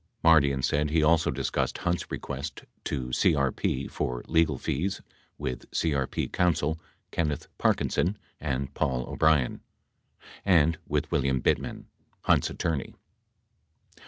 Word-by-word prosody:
55 - - -39
Mardian 70 -4 +4
said 75 +2 +1
he 80 +1 +2
also 80 +1 +4
discussed - - -1
Hunt's 90 0 -1
request 70 +1 -5 0.2
to 65 -3 -2
CRP 70 0 +1
for 60 -1 -2
legal 80 -4 +3
fees 85 +10 -2 0.4
with 65 -1 -5
CRP 70 -5 -1
counsel 80 -3 +1 0.3
Kenneth 75 -4 -1
Parkinson 95 +5 +1 0.2
and 70 -2 -2
Paul 60 -2 -1
O'Brien, 75 -5 +2 0.8
and 85 -4 +4
with - - -1
William 65 -1 +2
Bittman, - - 0 0.4
Hunt's - - +3
attorney. 75 -5 -2
75 Hz, 115 wpm, -28 LUFS, 65-80 Hz, 0.8 s, Mardian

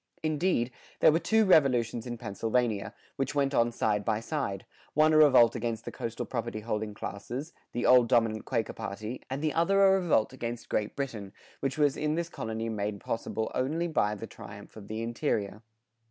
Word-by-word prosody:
[113:1] 155 - +1
Indeed, 145 -6 +1 0.3
there - - +7
were 160 - +2
two 220 +4 +3
revolutions 125 - +3
in 120 -1 -4
Pennsylvania, 110 0 -1 0.2
which 135 +1 -2
went 140 -1 +1
on 120 -2 +3
side 105 -3 0
by 110 -1 0
side: 115 -6 -3 0.3
one 155 +1 +5
a - - +5
revolt 130 -6 +7
against 115 -1 -3
the - - -5
coastal 115 -1 -4
property 115 -3 -4
holding 105 -1 -3
classes, 125 +10 -6 0.2
the 120 - -2
old 125 -2 +6
dominant 115 -3 +2
Quaker 115 -3 -1
party, 105 +5 -6
and 135 +3 -3
the 155 - +1
other 195 +4 +4
a 190 - +6
revolt 155 -11 +1
against 120 -2 -5
Great 105 -1 -1
Britain, 110 -8 -5 0.3
which 135 0 -2
was 145 -2 +3
in 150 0 -1
this 170 0 -2
colony 110 -5 -4
made 105 -2 -3
possible 110 +1 -3
only 155 +7 0
by 105 -10 +1
the 110 - -7
triumph 100 -2 -11
of 105 -2 -10
the 110 +1 -4
interior. 110 -4 -2
120 Hz, 185 wpm, -29 LUFS, 110-145 Hz, 0.3 s, there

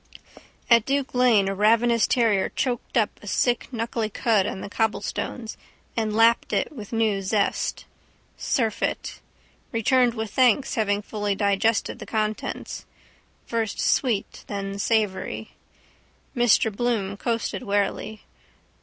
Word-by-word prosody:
At 235 -2 +6
Duke 275 +2 -1
lane 240 -6 +4
a 195 - 0
ravenous 230 +3 +3
terrier 225 -6 +2
choked 245 -2 -2
up 215 -3 +1
a 205 - -12
sick 240 +4 +1
knuckly 230 -2 -2
cud 215 -3 +1
on 190 - -5
the - - -6
cobblestones 220 +2 -3 0.4
and 220 -2 -1
lapped 230 +1 +4
it - - 0
with 215 -9 -9
new 220 -3 +1
zest. 200 +1 -1 0.5
Surfeit. 225 -4 -2 0.5
Returned 245 +1 +2
with 220 -2 -4
thanks 255 +1 +3
having 205 -2 0
fully 205 -1 -2
digested 205 +4 +1
the 215 - -9
contents. 215 -1 -3 0.6
First 225 -3 -2
sweet 230 -7 0
then 200 -1 -4
savoury. 210 -3 -1 0.8
Mr 235 -3 +3
Bloom 215 -4 -1
coasted 230 -2 -2
warily. 205 +1 -2
220 Hz, 120 wpm, -24 LUFS, 205-235 Hz, 0.8 s, At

